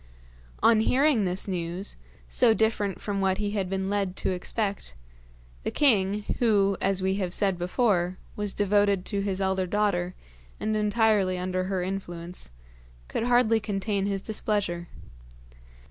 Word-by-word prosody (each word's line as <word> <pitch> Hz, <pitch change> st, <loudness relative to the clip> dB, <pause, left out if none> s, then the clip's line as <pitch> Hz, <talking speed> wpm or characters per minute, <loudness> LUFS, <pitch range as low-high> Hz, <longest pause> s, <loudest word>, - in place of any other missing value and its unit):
On 230 Hz, -1 st, +6 dB
hearing 255 Hz, -1 st, +3 dB
this 185 Hz, +2 st, -1 dB
news, 180 Hz, +1 st, -4 dB, 0.3 s
so 230 Hz, -3 st, +3 dB
different 220 Hz, -3 st, 0 dB
from 200 Hz, -2 st, -2 dB
what 190 Hz, -1 st, +2 dB
he 205 Hz, 0 st, -2 dB
had 195 Hz, -3 st, -2 dB
been 190 Hz, 0 st, -2 dB
led 200 Hz, -2 st, -1 dB
to -, -, -1 dB
expect, 195 Hz, -, -3 dB, 0.7 s
the -, -, -2 dB
king 210 Hz, -7 st, +3 dB, 0.2 s
who 200 Hz, -4 st, +3 dB
as 195 Hz, -1 st, +1 dB
we 190 Hz, +1 st, +1 dB
have 185 Hz, -2 st, -1 dB
said 195 Hz, -2 st, +1 dB
before 180 Hz, 0 st, +1 dB, 0.2 s
was 210 Hz, -1 st, -3 dB
devoted 205 Hz, -1 st, +2 dB
to 200 Hz, -2 st, -1 dB
his 195 Hz, -1 st, -2 dB
elder 190 Hz, -1 st, 0 dB
daughter 185 Hz, -3 st, 0 dB, 0.4 s
and 215 Hz, 0 st, -1 dB
entirely 210 Hz, -3 st, +2 dB
under 185 Hz, 0 st, -2 dB
her 190 Hz, -1 st, -1 dB
influence, 180 Hz, -2 st, -5 dB, 0.6 s
could 225 Hz, -, -2 dB
hardly 240 Hz, -2 st, +4 dB
contain 200 Hz, -1 st, -1 dB
his 195 Hz, -1 st, -2 dB
displeasure. 205 Hz, -5 st, -2 dB
195 Hz, 145 wpm, -27 LUFS, 185-210 Hz, 0.7 s, On